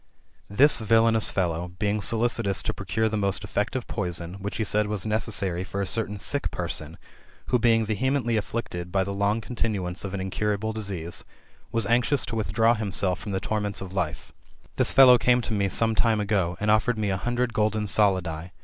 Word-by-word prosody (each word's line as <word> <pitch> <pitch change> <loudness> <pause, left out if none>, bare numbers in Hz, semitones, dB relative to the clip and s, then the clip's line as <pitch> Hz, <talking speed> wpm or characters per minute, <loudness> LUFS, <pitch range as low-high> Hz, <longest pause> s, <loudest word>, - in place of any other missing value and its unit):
This 135 +9 +4
villanous 115 0 +3
fellow, 90 -1 -2
being 105 +1 0
solicitous 115 -2 +1
to - - -2
procure 100 +4 -1
the 110 0 -2
most 100 -2 0
effective 105 +4 -2
poison, 90 -4 -3
which 100 -1 -4
he 110 - 0
said 105 0 +1
was 105 -2 -2
necessary 105 -5 0
for 100 +1 -5
a 100 - 0
certain 105 +1 0
sick 140 +8 -1
person, - - -4 0.5
who 125 - +3
being 115 -1 +3
vehe 110 +5 -1
mently 125 -4 0
afflicted 100 -5 -4
by 95 0 +2
the 100 +1 -4
long 100 +3 0
continuance 100 -6 -3
of 100 0 -5
an - - -3
incurable 105 +3 -2
disease, 95 -6 -3 0.5
was 115 -2 0
anxious 120 +5 +2
to 115 - -5
withdraw 110 +2 +2
himself 100 -4 -1
from 100 +2 -6
the 95 - -1
torments 105 0 -2
of 95 -1 -8
life; 90 -6 -3 0.4
this - - +3
fellow 125 -2 +7
came 125 +2 +3
to 115 -2 -4
me 100 -2 +1
some 115 +4 +2
time 110 0 +2
ago, 100 -4 0
and 105 0 +1
offered 110 +2 +2
me 105 -2 -1
a 95 - 0
hundred 120 +3 -1
golden 110 0 0
solidi 95 -6 +1
[Z. - - -13
105 Hz, 195 wpm, -25 LUFS, 95-115 Hz, 0.5 s, fellow